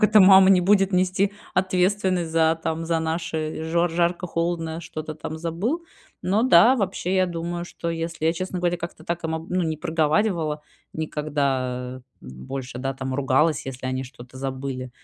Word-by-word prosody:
Как - - +5
это 210 0 +6
мама 190 0 +8
не 185 -2 +6
будет 195 0 +4
нести 185 +2 +2 0.2
ответственность 185 -1 +1
за, 160 0 +3
там, 160 +1 -2
за 165 -1 +1
наши 160 -1 -3
жор 170 +2 +1
жарко-холодно, 170 -1 -1
что-то 155 -1 -6
там 155 +1 -6
забыл?". 190 - -2 0.4
Но 200 +4 +2
да, 245 +1 +6
вообще, 190 -3 -1
я 185 0 +3
думаю, 170 0 -4
что 170 -1 -5
если 165 -1 -4
я, 160 - +4
честно 185 +2 -4
говоря, 175 0 0
как-то 170 -1 -7
так, 170 +1 -3
ам, 160 +1 -3
ну, 180 0 +1
не 160 -1 -1
проговаривала 160 0 0 0.3
никогда, 135 -5 -2 0.2
м, 65 0 -11
больше, 130 -2 -5
да, 135 +1 -2
там, 130 0 -4
ругалась, 140 +3 +2
если 130 -1 -5
они 130 0 -2
что-то 125 0 -12
забыли, 130 -1 -4
165 Hz, 170 wpm, -24 LUFS, 150-180 Hz, 0.4 s, мама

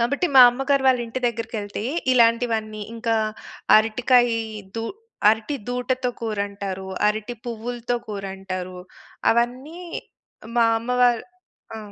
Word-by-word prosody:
కాబట్టి 280 +9 +1
మా 260 - +11
అమ్మగారు 270 +2 0
వాళ్ళింటి 245 -2 +1
దగ్గరకెళ్తే 220 -3 -4 0.3
ఇలాంటివన్నీ 230 -3 +2
ఇంకా 230 0 -1 0.6
అరటికాయ 240 +3 +4 0.5
దూ 225 - -2 0.5
అరటి 225 +6 -1
దూటతో 250 +1 -1
కూరంటారు. 200 -3 -4 0.2
అరటి 215 +3 -1
పువ్వులతో 240 +1 -4
కూరంటారు. 190 -2 -5 0.5
అవన్నీ 255 +8 -1 0.8
మా 235 - +5
అమ్మ 235 +2 -6
వాళ్ళు 240 -2 +3 0.5
ఆ! - - -6
230 Hz, 100 wpm, -23 LUFS, 215-245 Hz, 0.8 s, మా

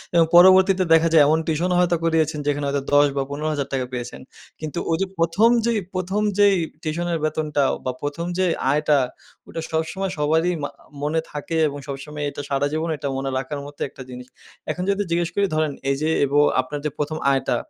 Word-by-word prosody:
এবং 165 -1 +6
পরবর্তীতে 190 +1 +7
দেখা 165 0 +5
যায় 155 -3 +7
এমন 155 +2 +3
টিউশনও 170 +3 0
হয়তো 175 -1 +3
করিয়েছেন 160 -2 +1
যেখানে 145 0 0
হয়তো 140 0 -1
১০ 145 0 +6
বা 135 - +1
৳১৫,০০০ 140 -3 -2
পেয়েছেন। 120 0 -6 0.4
কিন্তু 155 +2 -4
ওইযে 165 +4 +1
১ম 165 +7 +3 0.2
যেই 235 -2 +1
১ম 185 +3 -1 0.2
যেই 205 -1 +6 0.3
টিউশনের 170 +1 -1
বেতনটা 155 -2 0
অ - - -1
বা 130 - 0
১ম 145 +4 -3
যে 185 - +2 0.3
আয়টা, 150 0 +2 0.5
ওটা 165 - -5
সবসময় 165 +4 -2
সবারই 160 +4 +2
মা 145 - -2 0.3
মনে 150 +3 0
থাকে 150 +2 -4
এবং 145 0 -5
সবসময় 145 +2 -6
এটা 145 - -7
সারাজীবন 145 +4 -1
এইটা 145 -1 -5
মনে 135 0 -2
রাখার 135 +2 -4
মতো 145 0 -12
একটা - - -13
জিনিস। 125 0 -9 0.4
এখন 180 - -4
যদি 200 +1 +1
জিজ্ঞেস 170 0 +1
করি 200 0 +2
ধরেন 155 -1 +1 0.2
এইযে 150 +3 -1 0.2
এব 140 - -6 0.3
আপনার 130 +3 -6
যে - - +3
১ম 150 +1 -2
আয়টা, 135 -1 +1
155 Hz, 185 wpm, -22 LUFS, 145-170 Hz, 0.5 s, পরবর্তীতে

